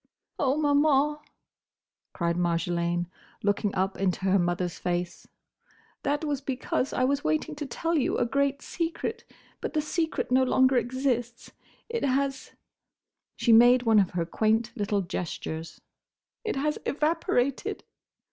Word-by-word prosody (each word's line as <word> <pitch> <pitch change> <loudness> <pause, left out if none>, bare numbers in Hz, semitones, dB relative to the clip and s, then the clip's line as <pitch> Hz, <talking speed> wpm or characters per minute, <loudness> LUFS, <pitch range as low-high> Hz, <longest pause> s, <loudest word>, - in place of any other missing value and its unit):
"Oh, 275 0 +2
Maman!" 295 0 +3 0.9
cried 170 -2 -1
Marjolaine, 175 0 0 0.4
looking 205 0 0
up 190 +1 -1
into 190 -1 0
her 190 +1 +3
mother's 175 0 -1
face, 175 -1 -3 0.7
"that 290 +2 -1
was 285 -2 -1
because 265 -1 -2
I 255 - 0
was 275 +2 +1
waiting 155 - 0
to 295 -1 -4
tell 330 +7 -2
you 285 - +1
a - - +2
great 280 +2 0
secret. 345 +7 -3 0.4
But - - -4
the 310 - +1
secret 320 -2 -2
no 260 +1 +5
longer 260 0 +3
exists. 245 -1 -1 0.4
It 465 0 -3
has"—she 275 0 -1 1.0
made 245 +2 +7
one 225 -3 +5
of 190 -3 +2
her 170 - +1
quaint 220 +6 +1
little 205 -1 0
gestures—"it 170 - -7
has—evaporated!" 300 -2 0
250 Hz, 125 wpm, -27 LUFS, 190-285 Hz, 1.0 s, made